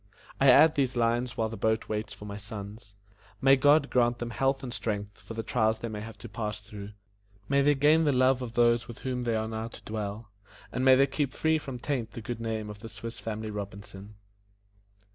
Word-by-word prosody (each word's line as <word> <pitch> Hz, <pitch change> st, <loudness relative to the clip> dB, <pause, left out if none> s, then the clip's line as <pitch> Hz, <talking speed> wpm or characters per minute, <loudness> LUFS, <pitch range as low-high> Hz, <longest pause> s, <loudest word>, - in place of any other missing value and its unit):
I 135 Hz, -, +6 dB
add 150 Hz, +5 st, +8 dB
these 130 Hz, -3 st, 0 dB
lines 120 Hz, +1 st, 0 dB
while 110 Hz, -1 st, 0 dB
the 115 Hz, -, -6 dB
boat 110 Hz, 0 st, 0 dB
waits 105 Hz, 0 st, -3 dB
for 105 Hz, -, -9 dB
my 100 Hz, -1 st, -6 dB
sons. 105 Hz, -1 st, -9 dB, 0.4 s
May 135 Hz, 0 st, +6 dB
God 145 Hz, +2 st, +4 dB
grant 120 Hz, -1 st, +3 dB
them 120 Hz, 0 st, -5 dB
health 135 Hz, +2 st, 0 dB
and 125 Hz, -2 st, -5 dB
strength 105 Hz, -1 st, -4 dB
for 105 Hz, +3 st, -9 dB
the 115 Hz, -, -3 dB
trials 110 Hz, -2 st, +1 dB
they 115 Hz, -, -5 dB
may 105 Hz, -1 st, -5 dB
have 110 Hz, 0 st, -9 dB
to -, -, -4 dB
pass 105 Hz, 0 st, -4 dB
through; 105 Hz, 0 st, -10 dB, 0.5 s
may 140 Hz, +2 st, +3 dB
they 145 Hz, +1 st, +4 dB
gain 150 Hz, +4 st, +4 dB
the 145 Hz, -, +4 dB
love 130 Hz, 0 st, +3 dB
of 120 Hz, -2 st, -5 dB
those 120 Hz, 0 st, +3 dB
with 120 Hz, -, -10 dB
whom 125 Hz, -1 st, -1 dB
they 120 Hz, -2 st, 0 dB
are 110 Hz, 0 st, -1 dB
now 110 Hz, 0 st, -4 dB
to 115 Hz, -, -13 dB
dwell; 105 Hz, 0 st, -5 dB, 0.4 s
and 125 Hz, -, -2 dB
may 130 Hz, 0 st, +7 dB
they 135 Hz, +1 st, +5 dB
keep 140 Hz, 0 st, -2 dB
free 160 Hz, 0 st, +2 dB
from 135 Hz, -4 st, -6 dB
taint 120 Hz, -3 st, -3 dB
the 115 Hz, -, -6 dB
good 115 Hz, 0 st, -5 dB
name 110 Hz, -2 st, -3 dB
of 105 Hz, -1 st, -8 dB
the 115 Hz, +1 st, -9 dB
Swiss 115 Hz, +2 st, -7 dB
Family 110 Hz, -1 st, -4 dB
Robinson. 100 Hz, 0 st, -8 dB
115 Hz, 220 wpm, -29 LUFS, 110-130 Hz, 0.5 s, add